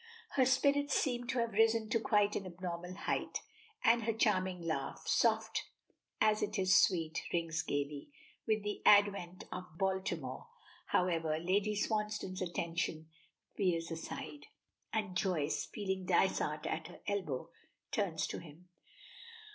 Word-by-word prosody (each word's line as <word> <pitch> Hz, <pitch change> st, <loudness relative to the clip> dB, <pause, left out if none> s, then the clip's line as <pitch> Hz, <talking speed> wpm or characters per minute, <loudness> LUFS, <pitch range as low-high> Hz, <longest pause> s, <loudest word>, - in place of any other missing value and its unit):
Her 260 Hz, -2 st, +3 dB
spirits 280 Hz, +2 st, +3 dB
seem 245 Hz, -3 st, 0 dB
to 255 Hz, -, -1 dB
have 235 Hz, -1 st, +1 dB
risen 225 Hz, +1 st, +3 dB
to 230 Hz, -, +2 dB
quite 210 Hz, -4 st, +2 dB
an 195 Hz, -, -3 dB
abnormal 180 Hz, 0 st, -5 dB
height, -, -, -2 dB, 0.4 s
and 235 Hz, +1 st, +5 dB
her 225 Hz, -, +1 dB
charming 190 Hz, -4 st, +1 dB
laugh, 150 Hz, -5 st, -3 dB
soft 220 Hz, -1 st, +2 dB, 0.5 s
as 215 Hz, -1 st, +3 dB
it 210 Hz, +1 st, -1 dB
is 185 Hz, -1 st, +4 dB
sweet, 165 Hz, -4 st, +3 dB
rings 165 Hz, -1 st, 0 dB
gaily. 145 Hz, -, -3 dB, 0.4 s
With 215 Hz, -1 st, +1 dB
the 210 Hz, 0 st, -3 dB
advent 200 Hz, -3 st, +4 dB
of 180 Hz, -3 st, -7 dB
Baltimore, 185 Hz, -9 st, -2 dB, 0.4 s
however, 165 Hz, -3 st, +1 dB
Lady 195 Hz, +5 st, +1 dB
Swansdown's 210 Hz, -3 st, -1 dB
attention 170 Hz, -2 st, -2 dB, 0.5 s
veers 170 Hz, -4 st, 0 dB
aside, 150 Hz, -2 st, -6 dB, 0.4 s
and 210 Hz, -4 st, -2 dB
Joyce, 180 Hz, -7 st, 0 dB
feeling 190 Hz, -3 st, -3 dB
Dysart 160 Hz, -4 st, +2 dB
at 160 Hz, 0 st, -2 dB
her 175 Hz, -, -13 dB
elbow, 185 Hz, -11 st, -2 dB, 0.4 s
turns -, -, 0 dB
to -, -, -4 dB
him. 170 Hz, +2 st, -14 dB
185 Hz, 130 wpm, -34 LUFS, 165-215 Hz, 0.5 s, and